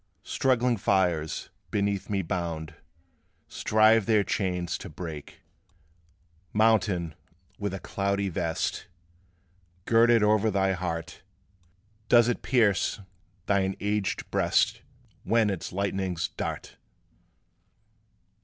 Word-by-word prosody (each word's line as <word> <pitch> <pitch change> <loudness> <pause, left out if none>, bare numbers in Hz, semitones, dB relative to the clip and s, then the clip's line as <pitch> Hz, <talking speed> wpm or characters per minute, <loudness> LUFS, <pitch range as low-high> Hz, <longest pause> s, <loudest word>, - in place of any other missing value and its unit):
Struggling 125 -2 +1
fires, 90 -6 0 0.2
beneath 100 -1 -1
me 100 -2 0
bound, 80 -2 -4 0.7
Strive 110 0 +3
their 110 -2 +4
chains 90 -3 -2
to - - -8
break." 80 -5 -8 1.1
Mountain, 100 -7 +2 0.5
with 100 -2 -2
a 95 - -5
cloudy 100 +1 -1
vest 80 -2 -2 1.0
Girded 115 -1 +5
o'er 105 +1 +3
thy 95 -1 +1
heart, 90 -1 -4 0.9
Does 120 -1 +6
it 120 - -1
pierce 110 -7 +2 0.5
thine 95 -1 +1
aged 105 0 -2
breast, - - +2 0.4
When 110 0 +2
its 95 - -5
lightnings 95 -2 -2
dart? - - -6
100 Hz, 95 wpm, -27 LUFS, 90-110 Hz, 1.1 s, Does